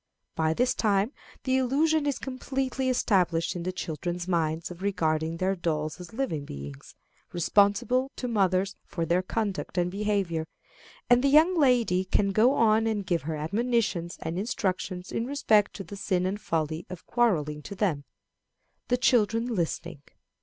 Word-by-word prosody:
By 160 Hz, 0 st, 0 dB
this 250 Hz, +6 st, +2 dB
time 205 Hz, +1 st, +1 dB, 0.3 s
the 260 Hz, 0 st, +2 dB
illusion 290 Hz, +4 st, +2 dB
is 285 Hz, -, 0 dB
completely 265 Hz, 0 st, -2 dB
established 180 Hz, -10 st, +1 dB
in 175 Hz, -, -4 dB
the 180 Hz, +2 st, -2 dB
children's 175 Hz, 0 st, -4 dB
minds 165 Hz, -1 st, -1 dB
of 175 Hz, +1 st, -10 dB
regarding 160 Hz, -4 st, 0 dB
their 190 Hz, +2 st, 0 dB
dolls 155 Hz, -2 st, -2 dB
as 180 Hz, -, -10 dB
living 225 Hz, -, -2 dB
beings, 70 Hz, -, -9 dB, 0.4 s
responsible 205 Hz, +9 st, +2 dB
to 250 Hz, -, -4 dB
mothers 195 Hz, -3 st, +1 dB
for 165 Hz, -2 st, -3 dB
their 170 Hz, +3 st, +2 dB
conduct 200 Hz, -1 st, -3 dB
and 175 Hz, 0 st, +1 dB
behavior; 195 Hz, -5 st, -1 dB, 0.6 s
and 245 Hz, +1 st, +5 dB
the -, -, +4 dB
young 315 Hz, +6 st, +5 dB
lady 245 Hz, -, +3 dB
can 195 Hz, +1 st, +1 dB
go 230 Hz, +7 st, +4 dB
on 220 Hz, 0 st, +3 dB
and 210 Hz, -3 st, -1 dB
give 175 Hz, -2 st, 0 dB
her 160 Hz, -, -1 dB
admonitions 200 Hz, +1 st, -1 dB
and 165 Hz, +3 st, -3 dB
instructions 190 Hz, -4 st, -2 dB
in 230 Hz, -, -2 dB
respect 220 Hz, -7 st, +2 dB
to 195 Hz, -, -6 dB
the 200 Hz, +3 st, -9 dB
sin 185 Hz, -2 st, 0 dB
and 200 Hz, +3 st, -2 dB
folly 160 Hz, 0 st, -2 dB
of 185 Hz, -2 st, -9 dB
quarrelling 155 Hz, -11 st, +1 dB
to 200 Hz, -, -8 dB
them 175 Hz, -8 st, 0 dB, 0.8 s
the 245 Hz, -, +2 dB
children 230 Hz, -1 st, +2 dB
listening. 170 Hz, -4 st, -3 dB
195 Hz, 160 wpm, -27 LUFS, 170-235 Hz, 0.8 s, and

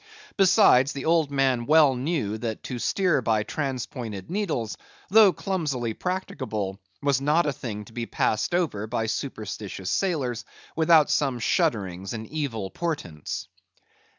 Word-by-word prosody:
Besides, 185 Hz, -, +5 dB
the 140 Hz, -, -5 dB
old 160 Hz, -2 st, +3 dB
man 135 Hz, -4 st, +1 dB
well 150 Hz, -2 st, +6 dB
knew 125 Hz, -6 st, -2 dB
that 110 Hz, -2 st, -4 dB
to 125 Hz, -, -5 dB
steer 180 Hz, 0 st, +1 dB
by 110 Hz, -2 st, +1 dB
transpointed 120 Hz, -, -4 dB
needles, 160 Hz, -, -2 dB, 0.3 s
though 210 Hz, 0 st, +7 dB
clumsily 150 Hz, -, -2 dB
practicable, 110 Hz, -, -3 dB, 0.2 s
was 140 Hz, -2 st, +2 dB
not 150 Hz, +5 st, +3 dB
a 145 Hz, -, 0 dB
thing 105 Hz, -5 st, -6 dB
to 115 Hz, -, -16 dB
be 115 Hz, -1 st, -4 dB
passed 110 Hz, +11 st, 0 dB
over 130 Hz, -, -1 dB
by 110 Hz, 0 st, -1 dB
superstitious 110 Hz, -5 st, -4 dB
sailors, 140 Hz, -, -1 dB, 0.3 s
without 160 Hz, -2 st, +5 dB
some 135 Hz, -4 st, +1 dB
shudderings 95 Hz, -4 st, 0 dB
and 110 Hz, -1 st, -5 dB
evil 115 Hz, -9 st, -4 dB
portents. 145 Hz, -, -4 dB
130 Hz, 135 wpm, -25 LUFS, 110-160 Hz, 0.3 s, though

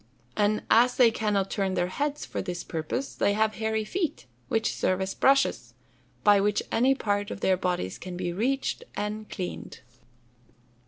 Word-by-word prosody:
And 210 Hz, +1 st, +1 dB
as 245 Hz, +2 st, +5 dB
they 240 Hz, -3 st, +6 dB
cannot 205 Hz, -3 st, 0 dB
turn 190 Hz, -2 st, -1 dB
their 175 Hz, -1 st, +1 dB
heads 290 Hz, +8 st, -2 dB
for -, -, -4 dB
this 175 Hz, -1 st, -4 dB
purpose, 165 Hz, -, -3 dB
they 200 Hz, -, +1 dB
have 215 Hz, +1 st, +1 dB
hairy 220 Hz, 0 st, 0 dB
feet, 345 Hz, -, -2 dB, 0.2 s
which 225 Hz, -, 0 dB
serve 185 Hz, 0 st, 0 dB
as 190 Hz, 0 st, -2 dB
brushes, 275 Hz, 0 st, +2 dB, 0.5 s
by 205 Hz, -1 st, +6 dB
which 210 Hz, +1 st, +1 dB
any 260 Hz, +4 st, +3 dB
part 205 Hz, -4 st, -1 dB
of -, -, -6 dB
their 190 Hz, -, +3 dB
bodies 180 Hz, -, -2 dB
can 180 Hz, -1 st, -7 dB
be 175 Hz, -1 st, -2 dB
reached 265 Hz, -, -1 dB
and 210 Hz, +1 st, -4 dB
cleaned. 180 Hz, -3 st, -6 dB
210 Hz, 165 wpm, -27 LUFS, 185-230 Hz, 0.5 s, they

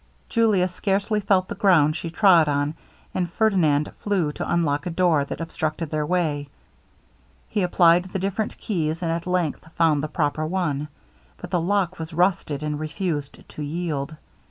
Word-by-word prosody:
Julia 215 Hz, -6 st, +3 dB
scarcely 200 Hz, +3 st, 0 dB
felt 195 Hz, -2 st, +2 dB
the -, -, -4 dB
ground 155 Hz, -6 st, +4 dB
she 170 Hz, -, -4 dB
trod 170 Hz, -3 st, +5 dB
on, 145 Hz, +1 st, 0 dB, 0.4 s
and 175 Hz, -2 st, -1 dB
Ferdinand 170 Hz, -8 st, +2 dB
flew 190 Hz, -7 st, 0 dB
to -, -, -4 dB
unlock 160 Hz, -1 st, +1 dB
a -, -, -1 dB
door 170 Hz, -4 st, +2 dB
that -, -, -6 dB
obstructed 160 Hz, -1 st, -3 dB
their 150 Hz, -1 st, -1 dB
way. 150 Hz, -5 st, 0 dB, 1.0 s
He 210 Hz, -, 0 dB
applied 175 Hz, -1 st, +4 dB
the 185 Hz, -, -4 dB
different 195 Hz, +3 st, -2 dB
keys, 165 Hz, -4 st, -2 dB
and 165 Hz, -, 0 dB
at 170 Hz, +1 st, -3 dB
length 170 Hz, -3 st, -1 dB
found 160 Hz, -3 st, +3 dB
the 155 Hz, -, -2 dB
proper 150 Hz, -1 st, -1 dB
one; 155 Hz, -5 st, -1 dB, 0.5 s
but 180 Hz, -, -9 dB
the 175 Hz, -3 st, +1 dB
lock 185 Hz, 0 st, 0 dB
was 160 Hz, 0 st, -6 dB
rusted, 170 Hz, -5 st, +1 dB
and 150 Hz, -1 st, -2 dB
refused 155 Hz, -2 st, -4 dB
to -, -, -9 dB
yield. 155 Hz, -1 st, -3 dB
170 Hz, 165 wpm, -24 LUFS, 150-185 Hz, 1.0 s, trod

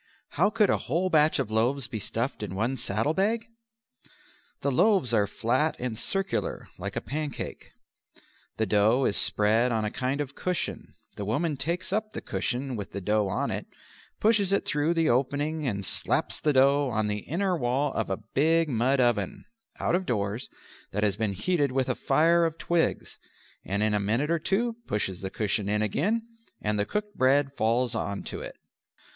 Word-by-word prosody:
How 185 Hz, +7 st, +2 dB
could 215 Hz, -2 st, +3 dB
a -, -, +1 dB
whole 185 Hz, +2 st, -1 dB
batch 155 Hz, 0 st, +4 dB
of 130 Hz, -7 st, -2 dB
loaves 120 Hz, +5 st, +1 dB
be 110 Hz, -, -5 dB
stuffed 115 Hz, +5 st, -3 dB
in 100 Hz, -3 st, -4 dB
one 115 Hz, +7 st, 0 dB
saddle 115 Hz, +3 st, 0 dB
bag? 220 Hz, +5 st, +1 dB, 1.2 s
The 140 Hz, -, +1 dB
loaves 180 Hz, -, +3 dB
are 105 Hz, -2 st, +3 dB
flat 130 Hz, +10 st, 0 dB
and 125 Hz, -2 st, -3 dB
circular 195 Hz, -, -2 dB
like -, -, -5 dB
a -, -, -1 dB
pancake. 150 Hz, -1 st, -5 dB, 0.8 s
The 110 Hz, -, +1 dB
dough 110 Hz, +6 st, +3 dB
is -, -, +1 dB
spread 110 Hz, +4 st, +3 dB
on 110 Hz, -2 st, 0 dB
a 105 Hz, -, -2 dB
kind 135 Hz, +2 st, -2 dB
of 140 Hz, -2 st, -3 dB
cushion, 180 Hz, +2 st, -3 dB, 0.2 s
the 105 Hz, -, -3 dB
woman 145 Hz, -, 0 dB
takes 170 Hz, +7 st, -2 dB
up 215 Hz, +1 st, -1 dB
the -, -, -5 dB
cushion 125 Hz, +1 st, -2 dB
with 100 Hz, -3 st, -6 dB
the -, -, -3 dB
dough 105 Hz, +2 st, +1 dB
on 95 Hz, -, -1 dB
it, -, -, -4 dB, 0.5 s
pushes 210 Hz, -3 st, +3 dB
it 200 Hz, -, +1 dB
through 150 Hz, +3 st, +1 dB
the 165 Hz, -1 st, +2 dB
opening 145 Hz, +4 st, 0 dB
and 100 Hz, -4 st, -2 dB
slaps -, -, -1 dB
the 150 Hz, -, +2 dB
dough 140 Hz, +1 st, +4 dB
on 110 Hz, -1 st, +1 dB
the 105 Hz, 0 st, -1 dB
inner 185 Hz, -, -1 dB
wall 135 Hz, 0 st, 0 dB
of 110 Hz, -, -2 dB
a 95 Hz, -, -1 dB, 0.2 s
big 160 Hz, +3 st, +3 dB
mud 130 Hz, +2 st, +2 dB
oven 120 Hz, -6 st, +1 dB, 0.3 s
(out -, -, 0 dB
of 185 Hz, +1 st, 0 dB
doors) 105 Hz, +1 st, -2 dB, 0.4 s
that 105 Hz, +2 st, -1 dB
has 100 Hz, -2 st, +2 dB
been 105 Hz, -1 st, -1 dB
heated 145 Hz, -, 0 dB
with 130 Hz, 0 st, 0 dB
a -, -, +1 dB
fire 170 Hz, +2 st, +3 dB
of 165 Hz, -1 st, 0 dB
twigs, 170 Hz, -1 st, -1 dB, 0.4 s
and 100 Hz, +2 st, -1 dB
in 110 Hz, 0 st, +2 dB
a 105 Hz, -, +2 dB
minute 115 Hz, +10 st, 0 dB
or 170 Hz, -, +2 dB
two 225 Hz, +8 st, 0 dB
pushes 95 Hz, -3 st, -2 dB
the 95 Hz, -, -3 dB
cushion 105 Hz, 0 st, -1 dB
in 105 Hz, +1 st, +1 dB
again 210 Hz, -, 0 dB, 0.3 s
and 105 Hz, 0 st, -1 dB
the 105 Hz, -, 0 dB
cooked 210 Hz, 0 st, -3 dB
bread 135 Hz, +1 st, +3 dB
falls 120 Hz, +1 st, +1 dB
on 100 Hz, -3 st, -3 dB
to -, -, -6 dB
it. -, -, -7 dB
130 Hz, 185 wpm, -27 LUFS, 110-165 Hz, 1.2 s, batch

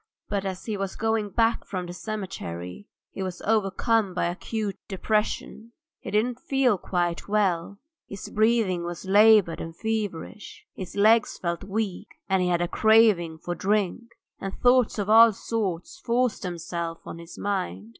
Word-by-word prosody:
But 200 Hz, -1 st, -1 dB
as 190 Hz, -1 st, -5 dB
he 215 Hz, -3 st, -3 dB
was 195 Hz, -1 st, -3 dB
going 220 Hz, -1 st, 0 dB
back 230 Hz, +2 st, +1 dB
from 185 Hz, -2 st, -4 dB
the 175 Hz, -, -7 dB
cemetery 175 Hz, -, -6 dB, 0.2 s
he -, -, -7 dB
was 185 Hz, -2 st, -4 dB
overcome 210 Hz, -1 st, +1 dB
by -, -, +1 dB
acute 200 Hz, +4 st, -3 dB
depression. 215 Hz, +3 st, -2 dB, 0.3 s
He -, -, -8 dB
didn't 235 Hz, +4 st, 0 dB
feel 260 Hz, -7 st, +1 dB
quite 175 Hz, -2 st, -2 dB
well: 200 Hz, -3 st, 0 dB, 0.3 s
his 200 Hz, -, -8 dB
breathing 215 Hz, -5 st, +2 dB
was 175 Hz, +2 st, -6 dB
laboured 205 Hz, -2 st, +5 dB
and 165 Hz, 0 st, -7 dB
feverish, 210 Hz, -2 st, -4 dB
his 185 Hz, 0 st, -8 dB
legs 215 Hz, +2 st, +4 dB
felt 170 Hz, 0 st, -3 dB
weak, 200 Hz, -1 st, -4 dB
and 190 Hz, -1 st, +2 dB
he 180 Hz, -, +1 dB
had 175 Hz, -1 st, +1 dB
a -, -, -1 dB
craving 215 Hz, -7 st, +4 dB
for 175 Hz, +2 st, -4 dB
drink. 200 Hz, +4 st, 0 dB, 0.3 s
And 195 Hz, 0 st, -5 dB
thoughts 245 Hz, -2 st, +3 dB
of 205 Hz, -2 st, -2 dB
all 225 Hz, +1 st, +7 dB
sorts 200 Hz, -, -3 dB
forced 245 Hz, -5 st, 0 dB
themselves 170 Hz, -1 st, -4 dB
on 170 Hz, -, -8 dB
his 170 Hz, 0 st, -11 dB
mind. 105 Hz, -, -3 dB
200 Hz, 155 wpm, -26 LUFS, 175-220 Hz, 0.3 s, all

